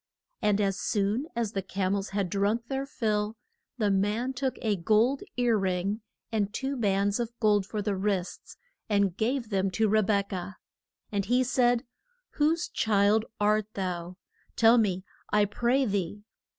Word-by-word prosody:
And 210 -1 +2
as 195 -2 0
soon 210 - 0
as 230 -3 -1
the 195 - -2
cam 190 0 -1
els 200 -1 -2
had 195 -1 -1
drunk 210 +4 0
their 270 0 -2
fill, 215 -3 -1 0.4
the 210 -4 +2
man 210 +6 0
took 260 0 -2
a 215 -2 +2
gold 220 +9 +2 0.2
ear 245 -2 +3
ring, 190 +3 -1 0.3
and 210 -3 0
two 270 +5 -3
bands 200 -2 +1
of 235 0 -4
gold 210 -3 +3
for 210 -1 -3
the 200 0 0
wrists, 190 -2 -3 0.3
and 200 -4 +2
gave 235 +2 -1
them 195 -1 +1
to 215 +4 +1
Re 215 +1 +4
bek 200 -1 0
ah. 185 +2 -5 0.6
And 200 -2 -1
he 250 +3 +3
said, 245 -1 +2 0.5
Whose 310 +3 +1
child 215 0 +2
art 210 0 +2
thou? 180 -2 -4 0.4
tell 230 +1 +6
me, 190 -3 0 0.2
I 210 0 +3
pray 240 +6 +1
thee. 200 -1 -2
210 Hz, 165 wpm, -28 LUFS, 195-235 Hz, 0.6 s, tell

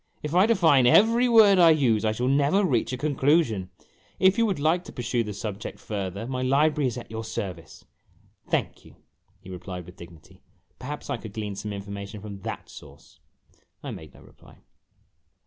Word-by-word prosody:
" - - -39
If 150 +1 -4
I 185 +4 +5
define 160 - +4
every 230 - +5
word 210 -5 +6
I 170 -2 +7
use, 125 -9 +3
I 110 - +2
shall 120 +4 -2
never 145 +9 +2
reach 120 -7 0
a 130 - -3
conclusion. 135 - +1 0.5
If 190 +1 +4
you 230 - +3
would 195 - -1
like 160 +4 +1
to - - -10
pursue 120 -2 -2
the 105 - -6
subject 105 0 -6
further, 100 0 -5
my 130 +1 -4
library 145 +2 +2
is 125 -1 -4
at 120 - -9
your 110 0 -5
service." 90 -7 -7 0.6
"Thank - - -2
you," - - -17 0.5
he 95 - -11
replied, 90 -1 -7
with 90 +1 -14
dignity; 85 -3 -15 0.4
"perhaps 145 +4 -6
I - - -1
could 110 -3 -10
glean 105 -1 -4
some 105 +2 -6
information 100 +1 -7
from 100 -1 -9
that - - -6
source." 70 +1 -15 0.6
I - - -5
made 80 -3 -11
no - - -16
reply. - - -19
120 Hz, 185 wpm, -25 LUFS, 100-155 Hz, 0.6 s, I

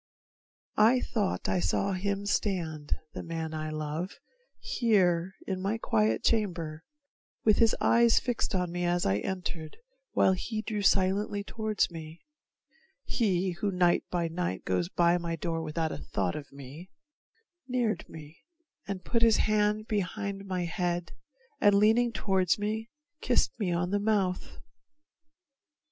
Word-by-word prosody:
I 230 +4 +6
thought 205 -5 -1
I 95 -1 +1
saw 90 - 0
him 200 +2 -2
stand, 170 -8 -1 0.2
the - - -5
man 165 -1 -4
I 155 0 -3
love, 155 +4 -4 0.4
Here 190 -6 +2
in 185 -1 -3
my 200 +4 0
quiet 110 - +1
chamber, 170 -8 0 0.6
with 215 -2 +5
his 225 -1 +4
eyes 235 0 +5
Fixed 245 -5 -2
on 180 -2 0
me 175 0 -2
as 175 0 +1
I 95 +1 +2
entered, 175 - -5 0.4
while 190 - +4
he 215 +4 -3
drew 215 -3 -2
Silently 200 +1 +2
toward 215 0 0
me 160 0 -9 0.8
he 190 -5 +1
who 195 +4 -2
night 180 -2 +3
by 175 -2 0
night 165 - -3
Goes 90 -2 0
by 170 - +3
my 170 -1 -3
door 165 0 -2
without 160 0 -2
a - - -4
thought 95 -3 -2
of 145 -1 -7
me 140 +6 -10 0.8
Neared 240 -7 -1
me 155 +1 -11 0.5
and 195 -2 -5
put 230 -1 +1
his 230 -2 +5
hand 215 0 +2
behind 200 -1 -2
my 180 -2 -1
head, 175 0 -2 0.5
And 205 -1 +5
leaning 225 +4 +4
toward 190 -5 +1
me, 215 +2 -3 0.3
kissed 250 - +2
me 195 -5 0
on 175 +1 0
the 205 - +2
mouth. 200 -3 -1
185 Hz, 145 wpm, -29 LUFS, 165-210 Hz, 0.8 s, I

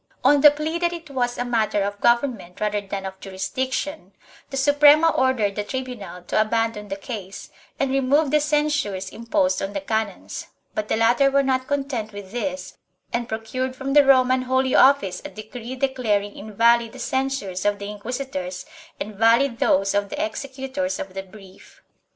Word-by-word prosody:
On 285 +2 +5
the 295 - +10
plea 305 +3 -3
that 345 0 +1
it 330 -4 -8
was 245 -2 -1
a 245 - -2
matter 220 -4 +1
of 205 0 -4
government 235 -7 +1
rather 210 -1 0
than 195 -1 -5
of 190 0 -7
jurisdiction, 200 - -4 0.4
the 270 - -4
Suprema 290 +3 +6
ordered 255 -8 +1
the 210 - -2
tribunal 240 -7 -6
to 195 - +1
abandon 225 -1 -1
the 195 - -4
case 200 -2 -8 0.3
and 275 -1 +1
remove 275 +2 +2
the 300 - +4
censures 295 -10 0
imposed 275 +5 0
on 195 +1 -3
the 195 - -1
canons, 220 0 -3 0.3
but 215 0 -3
the - - +1
latter 235 +5 +4
were 275 0 +3
not 260 -1 0
content 270 -7 -2
with 200 -2 -9
this 275 +4 -4 0.3
and 235 0 -2
procured 255 +4 -3
from 270 +1 -3
the 290 0 +7
Roman 255 -1 +4
Holy 260 +1 +1
Office 255 -9 +4
a - - -6
decree 235 +3 -8
declaring 235 -7 0
invalid 230 +2 +2
the - - -10
censures 260 -7 -2
of 205 0 +1
the 200 - -6
inquisitors 205 -4 -5 0.3
and 210 - -5
valid 230 +4 +3
those 195 +1 +2
of 205 0 0
the 305 +2 -1
executors 275 -1 -4
of 190 - -6
the 195 - -4
brief. 190 0 -16
240 Hz, 175 wpm, -23 LUFS, 205-275 Hz, 0.4 s, the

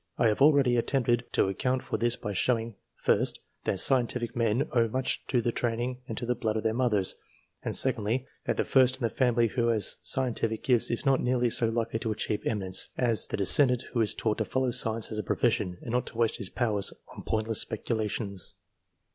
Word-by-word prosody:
I 115 - +3
have 105 - -1
already 140 -4 +5
attempted 120 -1 +1
to - - +3
account 125 +7 -1
for - - -4
this 120 +2 +2
by 105 - -5
showing, 115 +2 0 0.2
first, - - +1 0.3
that - - 0
scientific 125 -2 +1
men 115 +3 +1
owe 120 -2 +3
much 130 +3 -2
to 125 - +1
the 120 - 0
training 120 +2 -2
and 115 - -6
to 120 - -3
the 125 - +1
blood 110 -2 -2
of 110 - -3
their 110 - +1
mothers; 110 -6 +1 0.4
and, - - -2
secondly, 125 0 +2 0.2
that - - -1
the - - 0
first 130 -1 +4
in 130 - -8
the 115 - 0
family 120 -3 +2
who 120 +1 0
has 110 -4 +1
scien 130 -2 -1
tific 110 -1 -2
gifts 125 -3 +2
is 120 - -3
not 135 -1 +3
nearly 125 -1 +1
so 115 0 +4
likely 115 0 -2
to 110 - -2
achieve 105 0 -2
eminence, 95 -4 0
as 120 -3 0
the - - -3
descendant 125 +5 +4
who 120 - +1
is 110 - +1
taught 110 -1 -1
to 110 - 0
follow 130 +1 0
science 115 -2 0
as 110 - -3
a - - -2
profession, 90 0 0
and 115 - -5
not 125 +1 0
to 115 - -9
waste 115 -1 +1
his 100 -6 -3
powers 105 -5 -1 0.2
on - - -8
profitless 110 0 0
speculations. 105 -3 -2
115 Hz, 215 wpm, -28 LUFS, 110-125 Hz, 0.4 s, already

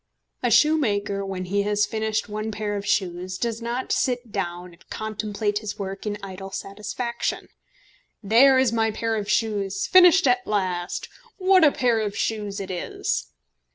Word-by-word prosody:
A 245 - +1
shoemaker 215 -7 +2
when 190 -1 -4
he 200 +3 0
has 210 0 +1
finished 220 0 -2
one 215 +1 -4
pair 210 -1 -3
of 200 0 -5
shoes 185 -2 -1
does 230 +1 -2
not 240 +2 -3
sit 245 -3 0
down 175 -3 -4
and 170 - -22
contemplate 210 -1 -2
his 210 -1 -6
work 195 +1 -5
in 205 0 -2
idle 195 0 -7
satisfaction. 210 +5 -4 0.7
"There 250 +6 +6
is 260 -3 +3
my 225 -1 +2
pair 225 +1 -2
of 210 -1 -3
shoes 200 -3 0
finished 370 0 +6
at 250 -1 +2
last! 185 -4 -2 0.3
What 375 -2 +4
a 300 - +7
pair 240 -4 +1
of 205 -2 -3
shoes 210 -2 -2
it 195 -1 -5
is!" 180 - -2
210 Hz, 160 wpm, -24 LUFS, 195-235 Hz, 0.7 s, a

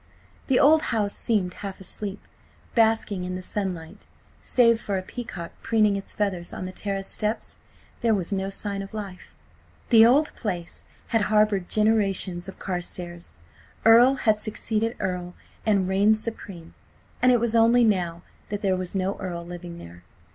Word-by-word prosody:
The 265 - +3
old 310 +2 +6
house 210 -3 0
seemed 200 -6 0
half 200 -1 -7
asleep, 200 +1 -5 0.5
basking 220 -4 +2
in 180 0 -4
the 185 - -6
sunlight. 180 -5 -4 0.3
Save 230 -2 +3
for 200 -2 -2
a 185 - -3
peacock 185 -6 -7
preening 215 -3 +2
its 195 - -6
feathers 185 -4 -1
on - - -6
the 185 - -5
terrace 195 0 -3
steps, 215 +3 -3 0.4
there 230 -2 +2
was 185 -2 -3
no 195 -1 -1
sign 200 0 -4
of 195 +2 -9
life.... 195 -4 -8 0.6
The 225 -2 +8
old 275 +7 +4
place 175 -6 -5 0.2
had 225 - +2
harboured 210 -4 +2
generations 195 -5 +1
of 195 - -9
Carstares. 175 -1 -5 0.5
Earl 240 +4 +7
had 215 -5 +2
succeeded 220 +1 -2
Earl 180 -2 -3 0.3
and 200 -3 +3
reigned 200 +3 +3
supreme, 200 -6 -7 0.5
and 255 - +6
it 245 - +4
was 235 0 0
only 230 +2 +5
now 175 -6 0 0.3
that 205 0 -4
there 190 -2 +2
was 185 +1 -3
no 195 +1 -1
Earl 175 -2 -5
living 175 0 -8
there. 85 - -12
200 Hz, 160 wpm, -25 LUFS, 185-220 Hz, 0.6 s, The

